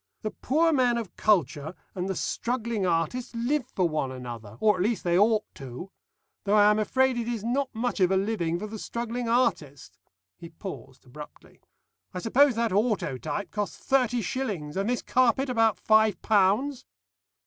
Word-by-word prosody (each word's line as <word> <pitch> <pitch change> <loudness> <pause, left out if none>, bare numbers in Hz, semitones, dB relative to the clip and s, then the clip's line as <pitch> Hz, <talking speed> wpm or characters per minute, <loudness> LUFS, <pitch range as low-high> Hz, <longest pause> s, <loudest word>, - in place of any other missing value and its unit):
The 215 - -2
poor 320 +5 +1
man 250 -4 +2
of 225 -5 -6
culture 160 -5 +1 0.2
and 185 0 -3
the 190 - -1
struggling 235 -4 -2
artist 180 +10 -1
live 250 +3 -1
for 185 -7 0
one 150 -5 -2
another, 120 -4 -8
or 210 -2 +4
at 180 - -3
least 220 +3 0
they 175 -1 +1
ought 215 +3 +4
to 135 +8 -9 0.5
though 205 +1 +2
I 210 0 +6
am 210 - +1
afraid 260 +4 +1
it 230 - -3
is 235 -4 -3
not 260 +4 0
much 240 0 -2
of 185 -2 +4
a 190 - +2
living 190 -5 -1
for 205 - -5
the 215 0 -7
struggling 235 +1 -4
artist." 145 - -1 0.4
He 170 - -10
paused 165 -6 -10
abruptly. 150 +4 -13 0.5
"I - - -2
suppose 245 +7 +3
that 230 0 0
autotype 205 - -1
cost 210 -1 -3
thirty 245 -3 +1
shillings, 190 - -3
and 195 +3 -1
this 245 - -1
carpet 255 +2 +2
about 225 -2 +2
five 220 -1 +3
pounds?" 220 +7 +2
215 Hz, 170 wpm, -27 LUFS, 180-240 Hz, 0.5 s, I